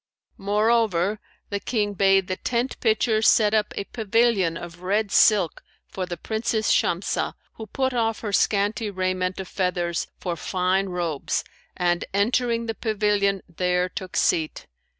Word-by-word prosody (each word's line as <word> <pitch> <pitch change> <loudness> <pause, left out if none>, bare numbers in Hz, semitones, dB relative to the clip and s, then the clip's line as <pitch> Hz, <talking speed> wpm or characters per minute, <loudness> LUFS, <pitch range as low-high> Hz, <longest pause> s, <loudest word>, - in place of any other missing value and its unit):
Moreover 210 -1 +1 0.3
the 200 - -1
King 205 0 -1
bade 195 -1 +3
the 185 - -2
tent 245 +1 -2
pitchers 220 -1 +2
set 215 -1 +4
up 215 -1 +1
a - - -2
pavilion 215 -5 +1
of 175 0 -9
red 200 +3 0
silk 200 -7 +4 0.3
for 185 -1 -5
the 175 -1 -5
Princess 220 +3 -1
Shamsah, 175 +2 0 0.2
who 220 - -7
put 260 +5 -1
off 225 -2 0
her 210 -3 -4
scanty 210 +2 +1
raiment 185 -1 -2
of 190 - -5
feathers 175 -3 -1
for 175 -2 -3
fine 185 +2 0
robes 170 -5 -2 0.3
and, 175 -1 +1
entering 235 +2 +1
the 225 - -2
pavilion, 205 -3 0
there 180 +1 0
took 185 0 -6
seat. 160 -2 +1
200 Hz, 145 wpm, -24 LUFS, 180-220 Hz, 0.3 s, set